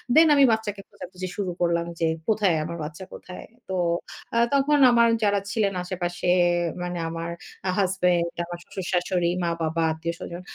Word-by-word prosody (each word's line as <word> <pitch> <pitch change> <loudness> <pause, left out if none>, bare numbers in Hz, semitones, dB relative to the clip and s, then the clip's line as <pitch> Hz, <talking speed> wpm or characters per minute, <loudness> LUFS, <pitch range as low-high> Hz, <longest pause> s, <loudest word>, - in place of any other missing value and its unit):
দেন 320 +1 +8
আমি 280 - +6
বাচ্চাকে 215 -2 -2
খোঁজাখুঁজি 185 +1 -8
শুরু 195 -3 -2
করলাম 170 -1 +1
যে, 165 - +2 0.2
"কোথায়? 205 -6 +3
আমার 170 +2 -5
বাচ্চা 150 +4 -7
কোথায়?" 180 - -9 0.2
তো - - -2 0.6
আ - - +3 0.2
তখন 280 +1 +3
আমার 235 0 +5 0.2
যারা 205 -1 +3
ছিলেন 205 -3 +1
আশেপাশে 175 -1 -3 0.6
মানে 175 0 -3
আমার 165 +1 -4 0.4
আ - - +2
হাসব্যান্ড, 180 -3 +2 0.2
আমার 175 0 -7
শ্বশুর-শাশুড়ি, 180 -1 -1
মা-বাবা, 165 -1 -1
আত্মীয়স্বজন। 170 +2 -5
180 Hz, 150 wpm, -25 LUFS, 170-200 Hz, 0.6 s, দেন